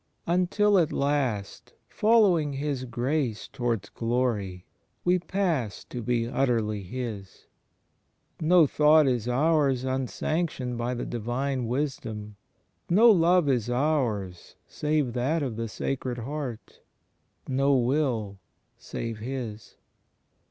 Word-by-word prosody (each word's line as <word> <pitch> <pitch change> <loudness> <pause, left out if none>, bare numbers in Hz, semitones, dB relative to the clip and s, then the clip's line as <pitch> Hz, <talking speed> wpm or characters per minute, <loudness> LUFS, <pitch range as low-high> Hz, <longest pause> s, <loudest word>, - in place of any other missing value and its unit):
Until 185 +4 +3
at 165 - +1
last, 135 -8 -1
following 195 -10 +3
His 135 -2 -3
grace 125 -1 -2
towards 120 -6 -2
glory, 115 -6 -2 0.4
we 180 +1 +3
pass 170 - -1
to 125 - -7
be 115 0 0
utterly 115 -5 0
His. 105 -1 -7 0.9
No 170 +1 +5
thought 150 +2 +5
is 120 -3 0
ours 140 0 +2
unsanctioned 130 +1 -2
by 120 +1 -2
the 120 - -4
Divine 120 +2 -2
Wisdom; 115 -5 -3 0.5
no 225 +7 +7
love 175 -3 +4
is 120 -4 +1
ours 120 - -1
save 150 -5 -1
that 140 +6 0
of 125 -5 -3
the 115 +1 -3
Sacred 125 +2 -3
Heart; 130 -1 -6 0.7
no 135 +1 +2
will 120 -6 0 0.4
save 115 -2 -5
His. 115 -3 -6
130 Hz, 110 wpm, -27 LUFS, 115-150 Hz, 0.9 s, no